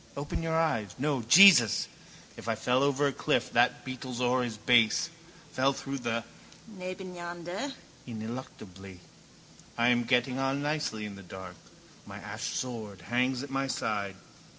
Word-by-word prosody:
Open 145 +3 -3
your 165 0 -1
eyes. 115 - 0
No. 140 -1 0
Jesus! 120 - +7 0.5
If - - -10
I 115 - +1
fell 125 +4 +1
over 140 0 +2
a 140 - +1
cliff - - 0
that - - +2
beetles 130 -1 -6
o'er 125 +1 +2
his 120 -3 -3
base, 120 +7 +3 0.4
fell 135 +2 +2
through 135 0 -5
the 115 -1 -2 0.4
nebeneinander 185 - -6 0.4
ineluctably! 110 -5 -8 0.8
I 120 +1 +4
am 120 -1 +2
getting 125 +1 +1
on 135 +1 0
nicely 145 -8 -2
in 105 - -6
the - - -10
dark. 95 -1 -9 0.5
My - - -8
ash - - -5
sword 110 -7 -5
hangs 125 +1 +1
at 140 - -8
my 135 0 -1
side. 100 -6 -2
125 Hz, 150 wpm, -29 LUFS, 115-145 Hz, 0.8 s, Jesus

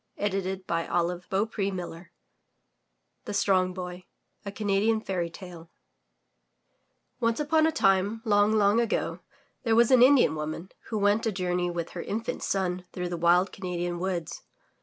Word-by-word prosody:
164 195 -2 -2 0.6
THROUGH 180 - -25 0.2
FAIRY 200 -3 -2
HALLS 175 -2 -6 1.2
THE - - -4
STRONG 185 -2 +2
BOY 180 0 -7 0.4
A 200 - -5
Canadian 210 +2 +1
Fairy 180 -5 -3
Tale 170 -2 -11 1.5
Once 230 0 +1
upon 315 +1 +3
a - - +1
time, 205 -2 +2
long, 205 -1 +4
long 210 0 +3
ago, 230 -2 -1 0.4
there 225 -3 +1
was 235 +1 +4
an 255 -2 +6
Indian 255 - +6
woman, 155 +4 -5 0.2
who 220 - -3
went 205 +3 +2
a - - +1
journey 180 -2 -1
with 170 -1 -4
her 175 - -5
infant 225 +6 -4
son 185 -2 -1
through 180 -1 -4
the 175 - -3
wild 175 +3 +3
Cana 180 -2 -5
dian 175 0 -2
woods. 175 -3 -3
195 Hz, 150 wpm, -27 LUFS, 180-215 Hz, 1.5 s, an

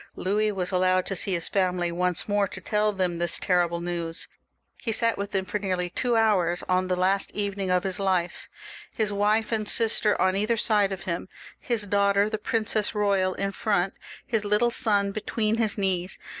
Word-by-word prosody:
Louis 210 +3 0
was 185 -2 -2
allowed 185 0 +2
to 195 - -3
see 190 +2 -1
his 170 -2 -2
family 180 -3 0
once 180 +1 0
more, 205 -1 +1
to 190 - -9
tell 210 +3 0
them 180 -4 -2
this 175 -1 +1
terrible 175 -2 +1
news. 170 -1 -2 0.5
He 230 - -2
sat 230 0 +3
with 200 0 -4
them 190 -1 -1
for 210 - -3
nearly 180 -3 -2
two 245 +5 0
hours 190 -6 +2
on 185 0 +1
the 185 - 0
last 190 +2 +1
evening 200 -2 -2
of 180 0 +2
his 190 -1 -3
life 185 -3 -1 0.2
— - - -17
^his 215 -2 +1
wife 210 +3 +1
and 215 -2 0
sister 220 -2 +2
on 185 0 +2
either 215 +4 +1
side 210 -2 +2
of 190 -2 -5
him, 180 0 -4 0.3
his 230 -4 0
daughter, 200 +1 +2
the 215 - -2
Princess 215 -1 0
Eoyal 200 -3 +1
in 195 0 -1
front, 195 -2 0 0.3
his 225 -3 0
little 210 +4 +2
son 205 -5 +3
between 215 +1 -1
his 220 -2 +1
knees. 190 -2 -1
200 Hz, 195 wpm, -26 LUFS, 185-210 Hz, 0.5 s, sat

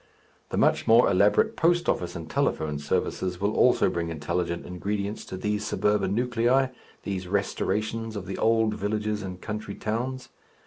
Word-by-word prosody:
The - - -3
much - - +2
more 115 +2 +6
elaborate 100 +3 +3
post 175 +2 +2
office 90 0 -1
and 85 -2 -6
telephone 75 -2 -1
services 90 +5 -1
will 100 +2 0
also 125 - +4
bring 85 -1 -2
intelligent 85 +2 -2
ingredients 100 +3 -3
to 95 - -6
these 105 +2 -1
suburban 105 -2 +1
nuclei, 125 +2 +2 0.3
these 95 -2 -4
restorations 110 +3 -1
of 100 -2 -5
the 95 - -5
old 110 -1 +3
villages 105 +1 -2
and 95 -2 -6
country 105 0 -5
towns. 125 +4 -3
105 Hz, 150 wpm, -26 LUFS, 90-110 Hz, 0.3 s, more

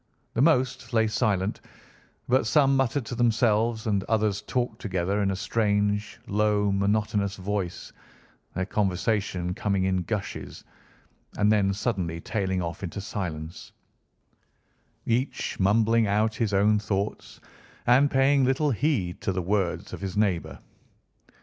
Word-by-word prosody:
The 115 - 0
most 130 -6 +2
lay 110 -1 +4
silent, 105 -3 0 0.7
but 125 -2 +2
some 135 +4 +4
muttered 135 -1 0
to 125 - -6
themselves, 115 -1 +2
and 100 -3 +1
others 105 -3 +1
talked 120 +3 -2
together 95 0 -1
in 100 - +1
a 95 - -1
strange, 105 0 0
low, 105 0 +1
monotonous 100 0 0
voice, 95 -2 -4 0.6
their 95 +1 -1
conversation 95 -2 -1
coming 100 0 0
in 95 0 +1
gushes, 100 +2 -5 0.7
and 105 +1 +3
then 100 -2 +3
suddenly 95 -6 -2
tailing 95 -1 -2
off 85 0 -5
into 95 +1 -5
silence, 85 -5 -6 1.3
each 125 +4 -1
mumbling 110 +3 +3
out 105 +2 +1
his 110 -2 -1
own 105 +2 +3
thoughts 100 -1 -3 0.5
and 130 +4 +5
paying 135 0 +3
little 135 +3 +2
heed 115 - -1
to - - -1
the 95 -1 -2
words 95 -1 -1
of - - -7
his 95 0 -4
neighbour. 100 -5 0
105 Hz, 130 wpm, -26 LUFS, 95-115 Hz, 1.3 s, and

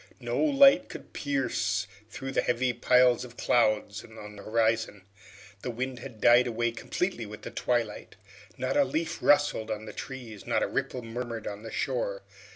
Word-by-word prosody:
No - - -2
light 280 -1 +6
could - - -10
pierce 130 -7 -1 0.2
through 135 +4 -6
the - - +2
heavy 125 +1 +1
piles 125 0 +4
of 120 -1 -11
clouds 110 -2 +1
on 110 -2 -11
the 100 - -10
horizon. 115 -2 0 0.6
The - - -4
wind 125 +2 -4
had 125 -3 -10
died 120 +3 +6
away 115 0 0
completely 120 - -3
with 105 0 -10
the - - -6
twilight. 120 -4 -2 0.4
Not - - -1
a 290 - +5
leaf 165 - -2
rustled 145 -7 +3
on 110 0 -4
the - - -8
trees, 120 -6 -8
not - - +2
a - - +1
ripple 125 - -3
murmured 115 -1 -5
on 100 0 -5
the 115 - -8
shore. 110 -6 -2
120 Hz, 170 wpm, -28 LUFS, 110-130 Hz, 0.6 s, light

